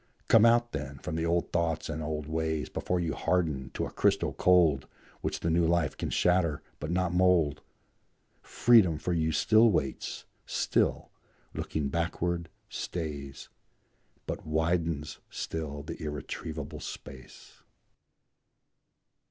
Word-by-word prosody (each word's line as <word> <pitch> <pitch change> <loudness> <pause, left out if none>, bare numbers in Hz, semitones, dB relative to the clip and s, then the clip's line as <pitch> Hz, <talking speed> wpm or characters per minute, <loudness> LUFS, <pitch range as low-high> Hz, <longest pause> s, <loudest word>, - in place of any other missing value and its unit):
Come 115 0 +7
out, 120 0 +3
then, 75 -2 -5
from 75 - -5
the 80 +1 0
old 85 +1 0
thoughts 80 -2 0
and 80 0 -4
old 75 -1 -3
ways, 80 -2 -2
Before 90 - -1
you 80 -3 -1
harden 80 -5 0
to - - -1
a - - -7
crystal - - +1
cold 85 -7 +4 0.3
Which - - -3
the 85 - 0
new 85 +1 +3
life 85 -4 +1
can - - -3
shatter, 90 -4 +2 0.2
but 75 - -4
not 90 0 0
mould; 90 -5 +3 0.8
Freedom 105 -10 +4
for 90 +3 -2
you 80 -1 +1
still 110 +7 +5
waits, 70 -9 -2 0.2
still, - - 0 0.4
looking 75 -3 -2
backward, 85 +1 -1 0.2
stays, 70 -5 -5 0.8
But - - -4
widens 80 -1 -1
still 75 -3 -4
the 80 +3 -7
irretrievable 75 0 -5
space. 65 -1 -10
80 Hz, 125 wpm, -29 LUFS, 75-85 Hz, 0.8 s, Come